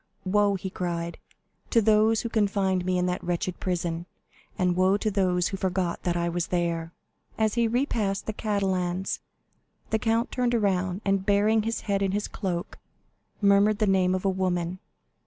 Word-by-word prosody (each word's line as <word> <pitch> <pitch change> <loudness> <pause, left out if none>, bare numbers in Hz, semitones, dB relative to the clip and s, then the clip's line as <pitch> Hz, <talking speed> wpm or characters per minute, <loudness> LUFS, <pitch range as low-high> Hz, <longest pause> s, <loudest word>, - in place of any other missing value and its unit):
"Woe," 200 +1 +3
he 190 0 -5
cried, 170 -2 -3 0.5
"to 235 - +4
those 220 0 +4
who - - -3
confined 195 -4 +1
me 185 0 +1
in 180 - +1
that 180 0 -2
wretched 175 +1 -2
prison; 170 -1 -2 0.5
and 180 -1 +1
woe 185 +2 +3
to 215 +1 -1
those 180 -3 +1
who 195 - -4
forgot 185 -2 -1
that 175 -1 -1
I 170 0 0
was 170 0 -1
there!" 170 -2 -1 0.5
50229m 220 - +1
As 215 - 0
he 235 -1 +2
repassed 225 -5 0
the 220 - -3
Catalans, 190 -3 -1 0.7
the 220 - +2
count 230 +2 0
turned 245 -1 +1
around 190 -3 0
and 195 -1 +1
burying 210 +2 +3
his 225 +2 -2
head 200 -1 -1
in 195 -1 0
his 205 +1 -1
cloak 175 -3 -4 0.6
murmured 200 +1 +4
the 215 - +2
name 185 -2 +3
of 185 - -4
a - - +4
woman. 185 -1 -1
190 Hz, 175 wpm, -26 LUFS, 180-210 Hz, 0.7 s, to